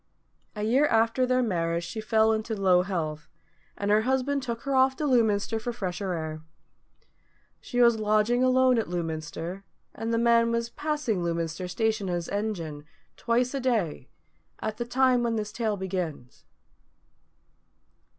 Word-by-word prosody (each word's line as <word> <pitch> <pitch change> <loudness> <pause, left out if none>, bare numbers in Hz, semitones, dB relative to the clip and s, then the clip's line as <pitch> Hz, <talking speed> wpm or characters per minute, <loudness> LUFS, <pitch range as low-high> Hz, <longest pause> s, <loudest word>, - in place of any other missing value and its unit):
A 210 - -4
year 260 +7 +3
after 230 +2 +2
their 255 0 +2
marriage 170 -5 -1
she 175 +6 -5
fell 220 0 +3
into 220 +1 -2
low 185 -3 +4
health, 160 -5 -4 0.5
and 205 0 -1
her 210 +1 +5
husband 265 +3 0
took 235 -3 -4
her 275 +2 -3
off 265 0 +4
to 305 - -3
Lewminster 225 -4 +2
for 240 +2 -3
fresher 190 -4 -3
air. 155 -2 -4 1.2
She 245 - -1
was 235 -2 +5
lodging 215 +3 +2
alone 255 -1 +4
at 220 - -2
Lewminster, 165 +2 -4 0.3
and 225 +1 -4
the 230 - +1
man 230 0 +4
was 235 0 -1
passing 295 - -2
Lewminster 170 +1 -2
station 220 0 -1
on 175 - 0
his 170 -1 -4
engine, 175 -8 -3 0.3
twice 245 +2 0
a 275 - -1
day, 220 - -1 0.5
at 215 0 -4
the 240 - -3
time 255 0 +3
when 235 -1 0
this 210 -1 -3
tale 220 -2 -1
begins. 180 -9 -5
220 Hz, 155 wpm, -27 LUFS, 180-240 Hz, 1.2 s, her